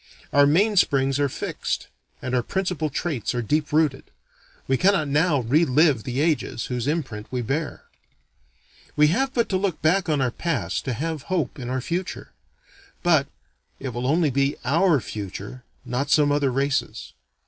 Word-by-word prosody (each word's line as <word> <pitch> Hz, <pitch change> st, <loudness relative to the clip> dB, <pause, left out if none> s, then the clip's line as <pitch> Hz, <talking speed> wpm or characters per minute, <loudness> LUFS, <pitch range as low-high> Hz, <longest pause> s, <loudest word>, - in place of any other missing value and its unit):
Our 145 Hz, 0 st, +6 dB
main 200 Hz, +8 st, +3 dB
springs 135 Hz, -4 st, +3 dB
are 145 Hz, -1 st, +2 dB
fixed, -, -, -3 dB, 0.4 s
and 130 Hz, -, -3 dB
our 125 Hz, -, +3 dB
principal 180 Hz, +1 st, -2 dB
traits 140 Hz, -, -2 dB
are 120 Hz, -, -1 dB
deep 150 Hz, +7 st, 0 dB
rooted. 150 Hz, -3 st, +1 dB, 0.6 s
We 135 Hz, -, +3 dB
cannot 185 Hz, 0 st, +3 dB
now 150 Hz, 0 st, +2 dB
re 135 Hz, +8 st, +3 dB
live 145 Hz, -4 st, +3 dB
the 130 Hz, +3 st, -1 dB
ages 155 Hz, -7 st, 0 dB
whose 125 Hz, 0 st, -3 dB
imprint 135 Hz, -9 st, -2 dB
we 125 Hz, -1 st, -2 dB
bear. 145 Hz, +6 st, -3 dB, 1.1 s
We 150 Hz, 0 st, +5 dB
have 265 Hz, -, +1 dB
but 235 Hz, -3 st, +1 dB
to 190 Hz, -, +1 dB
look 185 Hz, -4 st, -1 dB
back 175 Hz, +3 st, +2 dB
on 150 Hz, -2 st, +2 dB
our 130 Hz, -2 st, +1 dB
past 170 Hz, +6 st, -2 dB
to 130 Hz, -, -1 dB
have 155 Hz, +3 st, -4 dB
hope 160 Hz, -6 st, -1 dB
in 125 Hz, -1 st, -5 dB
our 130 Hz, 0 st, -1 dB
future: 175 Hz, +7 st, -4 dB, 0.7 s
but 160 Hz, -6 st, +3 dB, 0.5 s
it 135 Hz, -, -4 dB
will 120 Hz, 0 st, -5 dB
be 125 Hz, -, -1 dB
only 140 Hz, -3 st, +2 dB
our 165 Hz, +2 st, +3 dB
future, 105 Hz, +4 st, -7 dB, 0.2 s
not 125 Hz, +3 st, -2 dB
some 145 Hz, -1 st, +4 dB
other 145 Hz, -1 st, +2 dB
race's. 135 Hz, +2 st, -2 dB
145 Hz, 170 wpm, -24 LUFS, 130-165 Hz, 1.1 s, Our